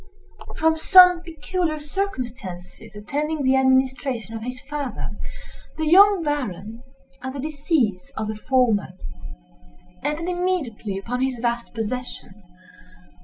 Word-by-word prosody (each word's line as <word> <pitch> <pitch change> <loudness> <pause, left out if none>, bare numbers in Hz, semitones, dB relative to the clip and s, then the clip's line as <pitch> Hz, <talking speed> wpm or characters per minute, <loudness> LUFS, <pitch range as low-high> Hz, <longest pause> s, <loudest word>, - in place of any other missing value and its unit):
From 320 0 +3
some 360 +1 +7
peculiar 335 0 -2
circumstances 245 - -5
attending 290 +8 -2
the 260 0 +4
administration 260 -3 +1
of 225 - -5
his 250 +2 -5
father, 285 -2 -4 0.7
the 315 - -1
young 390 +3 +6
Baron, 230 - -3 0.4
at 260 0 -5
the 280 - -6
decease 280 - -1
of 220 - -2
the 215 - -3
former, 225 -5 +1 1.1
entered 300 +4 -2
immediately 350 - -2
upon 245 +6 -3
his 260 -1 0
vast 235 0 -2
possessions. 225 -3 -5
265 Hz, 115 wpm, -23 LUFS, 225-315 Hz, 1.1 s, some